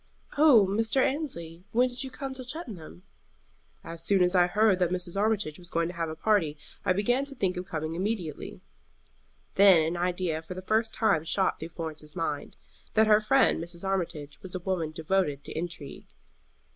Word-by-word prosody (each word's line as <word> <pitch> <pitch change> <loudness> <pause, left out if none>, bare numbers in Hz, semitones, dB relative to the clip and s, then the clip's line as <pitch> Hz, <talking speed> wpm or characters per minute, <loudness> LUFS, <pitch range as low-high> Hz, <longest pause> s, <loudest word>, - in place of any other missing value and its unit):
"Oh, 285 -9 +7
Mr. 225 +6 +1
Annesley, 180 - -2
when 245 +3 +4
did 245 +1 -3
you 265 - -5
come 270 0 -6
to 260 -1 -7
Cheltenham?" 220 - -7 0.8
"As 165 0 -6
soon 195 0 +4
as 180 +1 +2
I 175 -1 +5
heard 205 0 +3
that 180 -2 +2
Mrs. 180 0 -2
Armitage 205 -6 0
was 175 -1 -14
going 165 -1 0
to - - -6
have 165 -2 -2
a 155 - -5
party 165 -5 +1 0.3
I - - +2
began 245 +8 +2
to 280 0 -9
think 190 -7 0
of 180 0 -5
coming 155 0 -3
immediately." 180 -4 -4 1.0
Then 190 -5 +7
an 165 +2 -2
idea 175 -2 -1
for 170 +3 -8
the 185 - -7
first 220 +3 +1
time 190 -9 +2
shot 190 +3 +1
through 160 - -6
Florence's 155 -2 -7
mind 155 -3 -3 0.4
that 220 0 +6
her 215 0 +5
friend 255 -5 +3
Mrs. 170 +2 -5
Armitage 165 -6 -3
was 190 -1 -8
a - - -2
woman 180 -3 -2
devoted 155 -3 -1
to - - -8
intrigue. 165 -3 -6
185 Hz, 185 wpm, -28 LUFS, 165-220 Hz, 1.0 s, Oh